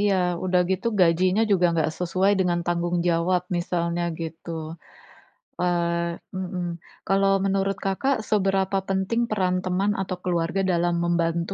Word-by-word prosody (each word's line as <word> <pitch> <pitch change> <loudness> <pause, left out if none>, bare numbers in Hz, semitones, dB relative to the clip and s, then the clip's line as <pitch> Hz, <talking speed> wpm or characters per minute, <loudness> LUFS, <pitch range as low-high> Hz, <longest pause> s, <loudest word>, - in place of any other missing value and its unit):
iya, 205 -1 +3 0.3
udah 180 -1 +3
gitu 190 +4 -1
gajinya 180 +3 +3
juga 180 -3 +4
enggak 160 -1 +1
sesuai 185 +3 +2
dengan 175 -2 +1
tanggung 175 0 0
jawab, 175 +1 +2
misalnya 175 0 -1 0.2
gitu. 165 +1 -6 1.1
Eee 170 -1 0 0.2
mhm. 185 -1 -3 0.4
Kalau 195 0 +3
menurut 195 0 0
Kakak, 265 +8 +1
seberapa 195 -2 +1
penting 195 +5 0
peran 185 -4 +1
teman 190 +3 +1
atau 185 -1 -3
keluarga 175 +1 0
dalam 175 0 +1
membantu 170 +1 0
180 Hz, 130 wpm, -24 LUFS, 170-195 Hz, 1.1 s, juga